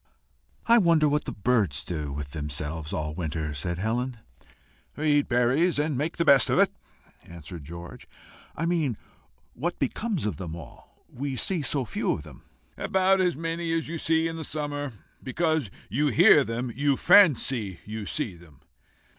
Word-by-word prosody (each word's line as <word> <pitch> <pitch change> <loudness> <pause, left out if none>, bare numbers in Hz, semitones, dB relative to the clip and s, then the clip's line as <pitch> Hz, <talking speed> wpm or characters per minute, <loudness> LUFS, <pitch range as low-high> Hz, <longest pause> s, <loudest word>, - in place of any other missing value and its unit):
"I 235 0 +6
wonder 165 -5 +4
what 150 +1 0
the - - -4
birds 105 - 0
do 75 -5 -4
with 70 0 -6
themselves 75 +1 -3
all 75 -1 -2
the 80 - -9
winter," 80 -2 -3
said 85 +5 -3
Helen. 120 +5 -2 0.8
"Eat 145 -1 +2
berries, 130 +8 +2
and 150 0 0
make 150 +6 -2
the 170 - +1
best 140 -4 +6
of - - +2
it," - - +4 0.5
answered 85 -1 -10
George. 85 +2 -10 0.5
"I 165 - -2
mean 160 -9 0 0.6
what 170 +8 -3
becomes 190 - -2
of 100 -8 -2
them 85 -2 -6
all. 85 - -14
We 135 +1 -5
see 175 +5 0
so 140 -2 -1
few - - -1
of - - -6
them." - - -13 0.4
"About 190 0 +2
as 180 -6 +1
many 165 +1 -3
as 165 -1 -1
you 165 0 -4
see 160 +1 +2
in 165 0 -5
summer. 145 -3 -4 0.3
Because 155 - 0 0.2
you 135 +9 0
hear 160 0 +6
them 120 +1 -3
you 140 0 +1
fancy 130 - +4
you 105 -1 -6
see 75 +4 -2
them." 85 -5 -18
130 Hz, 165 wpm, -26 LUFS, -, 0.8 s, I